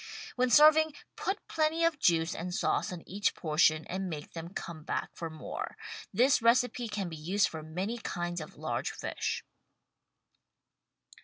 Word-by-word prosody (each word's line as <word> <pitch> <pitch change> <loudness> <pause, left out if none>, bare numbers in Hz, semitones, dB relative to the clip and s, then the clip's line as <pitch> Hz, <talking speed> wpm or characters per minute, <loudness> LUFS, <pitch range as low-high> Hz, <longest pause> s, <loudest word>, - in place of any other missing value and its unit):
When 255 0 +2
serving 310 +2 +7 0.2
put 390 +2 -3
plenty 320 +1 +1
of 330 -3 +2
juice 165 -4 +3
and 175 +1 -4
sauce 215 - +1
on 175 -2 -8
each 200 +2 0
portion 155 -1 +3
and 190 0 -3
make 150 -3 -7
them 165 0 -6
come 170 -4 -6
back - - -2
for 165 - -5
more. 155 -1 -6 0.3
This 250 +6 +4
recipe 240 +1 +3
can 205 -3 -3
be 165 - -6
used 185 +6 +2
for 160 - -6
many 185 +9 -3
kinds 175 -5 -3
of 155 - -10
large - - -2
fish. - - -3
185 Hz, 155 wpm, -31 LUFS, 165-250 Hz, 0.3 s, serving